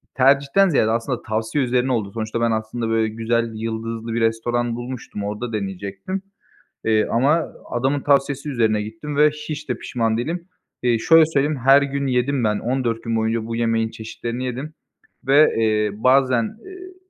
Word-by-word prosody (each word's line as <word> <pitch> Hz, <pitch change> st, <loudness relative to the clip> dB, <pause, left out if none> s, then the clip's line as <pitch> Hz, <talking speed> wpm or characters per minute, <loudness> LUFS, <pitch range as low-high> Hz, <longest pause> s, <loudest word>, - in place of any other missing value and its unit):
tercihten 140 Hz, +8 st, +4 dB
ziyade 110 Hz, -8 st, +2 dB
aslında 115 Hz, +2 st, -1 dB
tavsiye 110 Hz, +5 st, -1 dB
üzerine 125 Hz, +1 st, +1 dB
oldu. 110 Hz, -5 st, -1 dB
Sonuçta 115 Hz, +1 st, -3 dB
ben 115 Hz, 0 st, +2 dB
aslında 110 Hz, +1 st, -2 dB
böyle 115 Hz, 0 st, +2 dB
güzel, 115 Hz, +1 st, -1 dB
yıldızlı 115 Hz, +1 st, -4 dB
bir 115 Hz, -, -1 dB
restoran 115 Hz, +1 st, 0 dB
bulmuştum, 120 Hz, -4 st, -6 dB
orda 105 Hz, +3 st, -4 dB
deneyecektim. 100 Hz, -, -4 dB, 0.6 s
Eee, 110 Hz, -1 st, +2 dB
ama 145 Hz, +8 st, +2 dB, 0.2 s
adamın 135 Hz, +4 st, 0 dB
tavsiyesi 140 Hz, +1 st, +1 dB
üzerine 110 Hz, -5 st, +1 dB
gittim 110 Hz, +8 st, -6 dB
ve 150 Hz, +1 st, +5 dB
hiç 150 Hz, 0 st, -7 dB
de -, -, 0 dB
pişman 115 Hz, -3 st, -1 dB
değilim. 170 Hz, +8 st, -4 dB, 0.3 s
Eee, 120 Hz, -2 st, +2 dB
şöyle 165 Hz, +7 st, +6 dB
söyleyeyim, 150 Hz, -1 st, 0 dB
her 135 Hz, +2 st, +7 dB
gün 140 Hz, 0 st, -2 dB
yedim 125 Hz, 0 st, +1 dB
ben, 105 Hz, -1 st, +1 dB
14 120 Hz, -1 st, -1 dB
gün 115 Hz, 0 st, -1 dB
boyunca 110 Hz, 0 st, 0 dB
bu 115 Hz, 0 st, -4 dB
yemeğin 115 Hz, -1 st, 0 dB
çeşitlerini 115 Hz, +3 st, -6 dB
yedim 130 Hz, +5 st, -5 dB, 0.5 s
ve, 145 Hz, +3 st, +5 dB
eee, 110 Hz, -2 st, +2 dB
bazen, 130 Hz, -, +2 dB
iii, 370 Hz, -1 st, -11 dB
120 Hz, 160 wpm, -21 LUFS, 110-140 Hz, 0.6 s, her